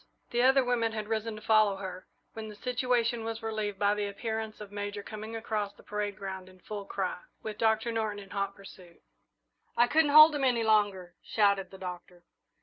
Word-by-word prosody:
The 240 - +2
other 265 +1 +5
women 235 -2 0
had 215 -1 -4
risen 220 0 -2
to 215 - -11
follow 215 -2 +4
her, 190 -1 -7 0.3
when 220 -1 -6
the 210 - -9
situation 245 -1 0
was 225 0 -5
relieved 215 -2 -2
by 205 +1 +3
the 210 -1 -2
appearance 220 +1 -4
of 210 -1 -9
Major 205 0 -4
coming 215 +2 -7
across 215 -2 -2
the - - -18
parade 210 -1 -3
ground 190 -1 -6
in 185 0 -18
full 205 +1 -7
cry, 190 -3 -3 0.2
with 215 0 -6
Doctor 220 +1 +2
Norton 220 -2 -1
in 195 -2 -11
hot 200 -1 -2
pursuit. 185 -3 -15 0.7
"I 240 - +6
couldn't 305 +4 +3
hold 305 +2 +9
him 290 -2 -1
any 245 -3 +2
longer!" 205 -5 +2
shouted 200 -3 +2
the 190 - -11
Doctor. 180 -1 -8
215 Hz, 195 wpm, -30 LUFS, 200-225 Hz, 0.7 s, hold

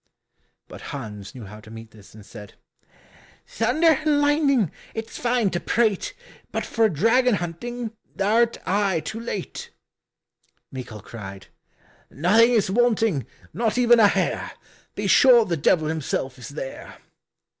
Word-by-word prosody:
But - - -11
Hans 105 -7 -8
knew 120 -4 -9
how 105 +2 -11
to 110 - -15
meet 115 0 -11
this, 105 -1 -17
and 105 -2 -13
said, 105 -1 -12 0.9
"Thunder 300 +7 +2
and 300 -2 +2
lightning, 290 - +2 0.2
it's 225 0 -6
fine 235 -4 +1
to 175 - -1
prate, 220 -2 0 0.4
But - - -3
for 225 -1 +2
dragon 230 - +3
hunting 220 +7 -5 0.2
thou'rt 225 +4 +2
aye 195 -2 +1
too 220 - -6
late." 220 -5 -6 1.0
Michal 125 -5 -8
cried, 100 -4 -10 0.6
"Nothing 205 - +4
is 220 -6 +1
wanting, 225 - +1 0.3
not 225 0 -1
even 240 -1 +5
a 215 - +7
hair, - - -1 0.4
Be - - -4
sure 245 -4 +6
the 175 - -1
Devil 155 +1 +2
himself 135 -4 -3
is 125 - -9
there." 140 -2 -8
205 Hz, 135 wpm, -23 LUFS, -, 1.0 s, a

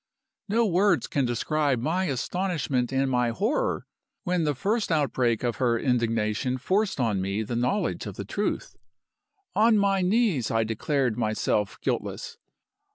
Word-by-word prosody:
No 230 +3 +3
words 180 - +3
can 140 -2 0
describe 140 +3 0
my 170 +9 0
astonishment 145 -4 -1
and 135 0 +1
my 125 -2 +1
horror 225 - -1 0.4
when 180 -3 0
the 150 -1 0
first 205 - 0
outbreak 130 -7 +1
of 120 -3 -1
her 120 -3 +2
indignation 115 0 0
forced 195 - 0
on 110 -6 +1
me 100 +3 -1
the 115 +3 -4
knowledge 125 - -1
of - - -6
the - - -6
truth. - - -3 0.8
On 220 +1 +5
my 200 -1 +2
knees 185 - +2
I 115 0 +2
declared 120 +2 -1
myself 110 -2 0
guiltless. - - -3
135 Hz, 145 wpm, -26 LUFS, 115-185 Hz, 0.8 s, On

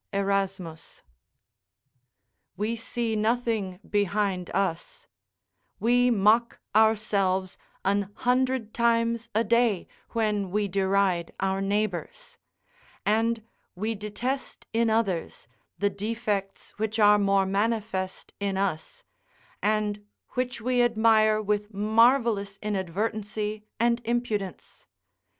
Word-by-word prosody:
Erasmus] 195 -4 -2 1.5
We 215 +4 -1
see 230 0 -2
nothing 220 -4 0
behind 200 -3 0
us; 190 -3 -2 0.7
we 245 +2 +3
mock 225 +2 +3 0.2
ourselves 200 -4 +2 0.3
an 200 0 +1
hundred 255 -2 0
times 230 -1 +1
a 225 - +3
day; 230 -4 +2 0.2
when 210 -4 0
we 205 +2 0
deride 190 -2 +1
our 195 0 0
neighbours; 205 - -2 0.7
and 225 +2 +1 0.3
we 215 +5 -2
detest 220 +6 -4
in 230 0 +2
others 210 -6 -1 0.3
the 200 0 +1
defects 205 -1 -3
which 220 0 -1
are 210 -1 +6
more 195 -1 +3
manifest 200 -1 -2
in 200 -1 -1
us, 195 - -3 0.6
and 210 0 0 0.3
which 250 -1 -2
we 250 +1 +2
admire 220 -2 +4
with 210 0 -1
marvellous 220 -1 +3
inadvertency 210 +2 -2
and 235 +1 +2
impudence. 225 -5 -3
210 Hz, 95 wpm, -27 LUFS, 195-230 Hz, 1.5 s, are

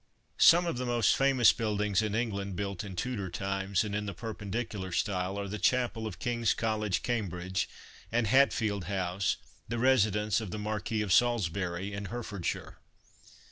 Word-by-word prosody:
Some 175 +1 +7
of 165 -8 -2
the 125 - -2
most 120 -3 +3
famous 135 -4 +5
buildings 105 -2 0
in 105 -1 -1
England 100 -4 -2
built 100 +1 -3
in 100 -3 -7
Tudor 105 -3 -3
times, 95 +1 -1
and 105 -2 -4
in 105 0 -2
the 100 - -5
per 115 -2 -5
pendicular 105 -2 -4
style, 95 0 -1
are 100 0 -3
the 105 +2 -5
Chapel 120 0 +1
of 100 - -7
King's 120 -2 0
College, 110 -4 -1
Cambridge, 95 -6 -2 0.4
and 120 0 +2
Hatfield 110 -5 +3
House, 95 0 -1 0.3
the 120 - -3
residence 110 -4 +3
of 110 - -5
the 105 - -5
Marquis 105 +1 -2
of 95 -4 +1
Salisbury, 100 -5 +1
in 100 0 -4
Hertfordshire." 105 -5 -4
105 Hz, 165 wpm, -30 LUFS, 95-115 Hz, 0.4 s, Some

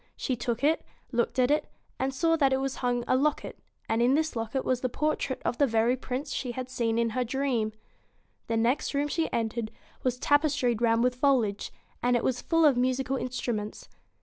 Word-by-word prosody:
She 255 - -2
took 240 +1 -3
it, 310 +3 +3 0.3
looked 240 0 0
at 255 +1 +3
it, 300 - +1 0.3
and 265 +1 0
saw 330 +5 +2
that 275 -4 +3
from 265 +1 +1
it 270 - -2
hung 245 -1 -1
a - - +3
locket, 290 +3 0 0.3
and 225 +1 +1
in 250 +3 +4
this 315 -1 0
locket 230 +3 -2
was 255 -1 0
the 255 - 0
portrait 290 -1 -1
of 240 - -1
the 285 - +5
very 230 +1 +2
Prince 260 +2 -4
she 250 -2 -3
had 255 +1 -5
seen 230 -3 0
in 230 -1 +1
her 250 +3 0
dream. 245 -3 -1 0.8
The 230 - 0
next 240 +5 +1
room 285 +1 +1
she 320 +2 -1
entered 225 -1 -2 0.3
was 250 -1 0
tapestried 290 -5 +2
round 230 0 +3
with 250 0 +2
foliage, 250 -6 +1 0.3
and 245 0 +2
it 240 - +1
was 250 -1 0
full 330 -1 +3
of 280 -5 +5
musical 260 +1 +1
instruments. 240 -5 -4
250 Hz, 200 wpm, -28 LUFS, 235-275 Hz, 0.8 s, the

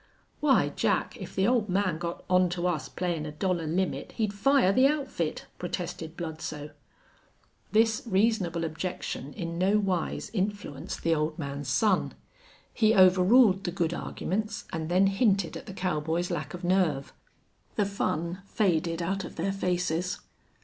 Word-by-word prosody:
"Why, 290 -3 +4
Jack, - - 0
if - - -8
the 190 - +2
ole 240 -3 +3
man 185 -4 0
got 170 0 -5
on 180 0 +4
to 175 - -1
us 175 -4 -1
playin' 170 -4 -2
a - - -5
dollar 170 +1 -1
limit 180 +4 -1
he'd 215 -3 -1
fire 205 -1 +4
the 260 +5 +6
outfit," 275 - -2
protested 175 -2 -5
Bludsoe. 155 -3 -5 1.0
This 220 0 +3
reasonable 190 -5 +1
objection 160 -3 -4
in 170 -4 -4
no 195 +3 +3
wise 190 -5 -1
influenced 200 -8 -3
the 165 - +3
old 155 0 -1
man's 140 -3 -5
son. 190 - +2 0.6
He 220 -1 +3
overruled 190 +2 +6
the - - -1
good 170 -2 0
arguments, 215 +5 -3
and 160 -1 -3
then 185 +2 +4
hinted 195 -3 +2
at - - -8
the - - -6
cowboys' 175 -2 -1
lack 155 +2 -3
of 180 - -9
nerve. 175 -7 +1 0.6
The 205 - +2
fun 175 -2 -2
faded 170 -5 +1
out 195 +2 -1
of - - -8
their 185 +4 -1
faces. 180 -1 -1
180 Hz, 150 wpm, -28 LUFS, 165-200 Hz, 1.0 s, the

